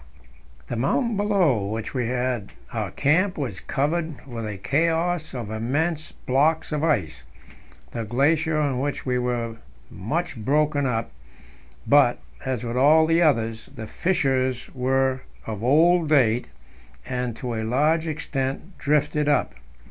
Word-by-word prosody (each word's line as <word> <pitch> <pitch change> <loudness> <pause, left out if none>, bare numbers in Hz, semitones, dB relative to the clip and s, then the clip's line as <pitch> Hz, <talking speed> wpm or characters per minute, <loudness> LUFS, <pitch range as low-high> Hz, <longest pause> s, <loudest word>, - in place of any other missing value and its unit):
The - - -3
mountain 220 - +1
below 185 - +2
which 110 +1 -4
we 125 -4 -1
had 125 -3 -2 0.2
our - - -2
camp 180 +7 +1
was 125 -10 -3
covered 155 +1 -2
with 115 -4 -5
a 105 -2 -5
chaos 165 - 0
of 115 -4 -5
immense 145 +9 -1
blocks 155 +6 +1
of 150 0 -1
ice. 115 - 0 0.7
The 115 - -3
glacier 150 +7 +1
on 140 -4 0
which 145 +1 -3
we 125 -1 +1
were 120 -1 -1
was 115 - -11 0.3
much 130 - -3
broken 145 +2 +2
up, 115 -5 -2 0.7
but, 140 -4 +5 0.3
as 130 -3 -2
with 120 +1 -3
all 155 +4 +6
the 165 +1 +3
others, 115 -8 +1
the 110 - -6
fissures 130 - 0
were 130 0 +1 0.2
of 110 -1 -5
old 160 +5 +4
date, 125 -5 +3 0.6
and, 125 -2 -3
to 125 0 -4
a 110 - -2
large 150 +8 +2
extent, 150 +2 -3
drifted 150 0 +1
up. 145 - +1
135 Hz, 140 wpm, -24 LUFS, 120-155 Hz, 0.7 s, all